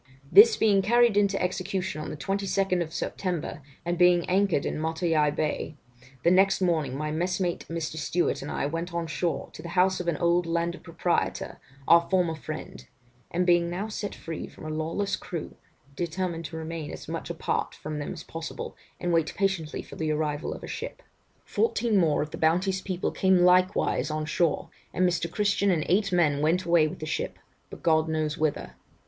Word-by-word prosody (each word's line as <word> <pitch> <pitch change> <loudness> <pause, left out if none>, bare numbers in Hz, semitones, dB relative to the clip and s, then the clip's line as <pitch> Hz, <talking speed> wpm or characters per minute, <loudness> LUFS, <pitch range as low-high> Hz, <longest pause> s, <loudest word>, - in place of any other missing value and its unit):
'This 215 +3 +9
being 205 -3 +4
carried 235 +2 +4
into 200 -1 +3
execution 185 -2 -2
on - - -5
the - - -6
22nd 195 -1 0
September, 170 -1 -3 0.2
and 175 0 -1
having 180 -1 +5
anchored 190 -5 +2
in 155 - -2
Matavai 160 -1 +1
bay, 150 +1 -2 0.5
the 170 - +5
next 195 +1 +4
morning 160 -8 0
my 150 +1 -2
messmate 180 +2 -1
(Mr. 165 -1 -3
Stewart) 175 +3 0
and 140 - -6
I - - -1
went 165 +4 -3
on 170 -1 -1
shore, 165 +1 -2
to - - -9
the 170 +2 -7
house 185 +1 +4
of 180 - -4
an 170 -3 +1
old 170 0 +2
landed 170 +1 -1
proprietor, 170 0 -1 0.3
our 170 0 +6
former 180 -3 +2
friend; 155 - -7 0.5
and 180 +1 0
being 175 -1 +4
now 190 +5 -3
set 210 -1 -4
free 165 -1 -6
from - - -12
a - - -4
lawless 165 +6 -1
crew, 170 -4 -6 0.4
determined 170 0 -3
to 160 +2 -6
remain 160 -1 -5
as - - -8
much - - -5
apart - - -2
from 155 0 -5
them 145 - -4
as 160 - -7
possible, 165 0 -6 0.2
and 175 -1 -1
wait 165 -1 +2
patiently 190 -5 -1
for - - -12
the 160 -1 -1
arrival 150 0 -1
of - - -11
a - - -6
ship. - - -6 0.4
Fourteen 235 - +1
more 155 -4 +2
of 150 - -8
the - - -7
Bounty's 185 +4 +2
people 185 -2 -2
came 190 -1 +3
likewise 185 0 +3
on 155 0 -2
shore, 155 +1 0 0.2
and 185 - +3
Mr. 170 -1 -1
Christian 205 +1 +1
and 165 -5 +1
eight 195 +2 +2
men 155 -5 +2
went 165 +4 +2
away 170 -2 +4
with - - -7
the 155 - -6
ship, 155 - -3 0.3
but - - -11
God 160 -1 +3
knows 155 -1 -1
whither. 145 - -1
170 Hz, 190 wpm, -27 LUFS, 155-185 Hz, 0.5 s, This